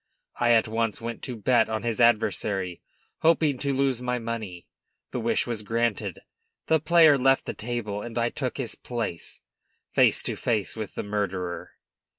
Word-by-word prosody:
I 120 0 +4
at 115 -1 +4
once 115 0 -1
went 115 0 -5
to 125 - -5
bet 115 +1 +3
on 110 0 -2
his 120 0 -1
adversary; 105 -5 +1 0.4
hoping 160 -4 +3
to 140 - 0
lose 135 -2 +1
my 125 0 -1
money. 115 -7 -5 0.5
The - - -2
wish - - +1
was 115 -3 -3
granted; 115 +2 -1 0.4
the 160 - +3
player 160 -2 +6
left 135 +1 +3
the - - -3
table 110 -3 -4
and 120 +1 -7
I 120 0 +2
took 130 -3 -3
his 130 -5 -3
place, 115 -9 -5 0.5
face - - +4
to - - -1
face 110 -5 -1
with 110 -2 -6
the - - -3
murderer. 95 -4 -3
115 Hz, 165 wpm, -26 LUFS, 105-125 Hz, 0.5 s, player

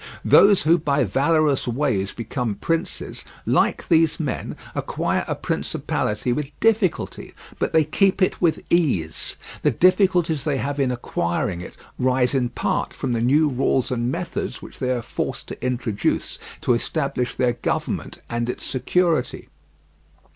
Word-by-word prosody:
Those 200 -1 +6
who 165 +3 +4
by 140 -1 +1
valorous 145 - +2
ways 120 -6 0
become 115 -1 -3
princes, 165 - -3 0.2
like - - +1
these 165 -2 +3
men, 145 -5 -3 0.2
acquire - - -1
a - - -1
principality 105 +4 -2
with 150 +1 -3
difficulty, 220 -5 0 0.2
but - - 0
they 160 -1 +4
keep 190 +6 +2
it 185 - +1
with 170 -3 +2
ease. 125 - +1 0.3
The - - +3
difficulties 180 -5 +3
they 145 -2 0
have 145 +1 -2
in 135 -2 +2
acquiring 90 -6 -2
it - - -10 0.2
rise 125 0 +2
in 125 -3 +1
part 120 - -2
from - - -3
the 115 - 0
new 145 +6 +4
rules 130 -1 +1
and 120 0 0
methods - - -4
which - - -12
they 125 - -1
are 125 -2 0
forced - - -4
to - - -8
introduce 125 -4 -1 0.2
to 125 - +3
establish 130 0 -1
their 125 -1 +2
government 120 - -3
and 120 0 -2
its - - -4
security. 155 +2 0
135 Hz, 145 wpm, -23 LUFS, 120-160 Hz, 0.3 s, Those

